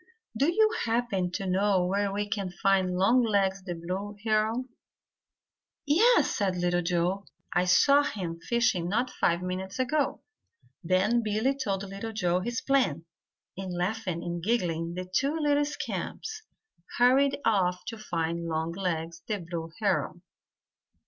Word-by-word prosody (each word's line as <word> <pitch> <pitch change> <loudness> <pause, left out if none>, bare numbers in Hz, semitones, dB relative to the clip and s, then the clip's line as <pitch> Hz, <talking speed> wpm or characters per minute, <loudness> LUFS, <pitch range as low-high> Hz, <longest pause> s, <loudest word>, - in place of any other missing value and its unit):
"Do 280 +9 +2
you 435 +4 +4
happen 225 -6 0
to 195 - -3
know 190 0 +2
where 200 +2 0
we 205 +1 -2
can 200 -3 -2
find 185 0 +1
Longlegs 200 -2 +3
the 180 -2 -5
Blue 185 +5 -5
Heron?" 220 +3 +1 1.2
"Yes," 410 +13 +4
said 190 -4 0
Little 175 0 +1
Joe. 180 +3 -1 0.3
"I 180 - +2
saw 280 +10 +5
him 180 -11 -4
fishing 210 -5 +1
not 240 +6 0
five 170 +1 0
minutes 185 +1 -4
ago." 270 +3 0 0.6
Then 185 +7 +2
Billy 220 +5 0
told 200 -7 -2
Little 200 +3 -6
Joe 180 -4 +1
his 240 +6 -3
plan, 255 - +1 0.5
and 190 -1 -5
laughing 180 -1 -2
and 175 0 -4
giggling, 170 -5 -1
the 185 0 -4
two 275 - 0
little 290 -1 +2
scamps 435 +8 -5 0.6
hurried 270 +3 +4
off 185 -5 +1
to 225 -1 -6
find 170 -3 -2
Longlegs 165 0 -2
the 210 - -1
Blue 165 -2 -6
Heron. - - 0
195 Hz, 135 wpm, -28 LUFS, 180-235 Hz, 1.2 s, saw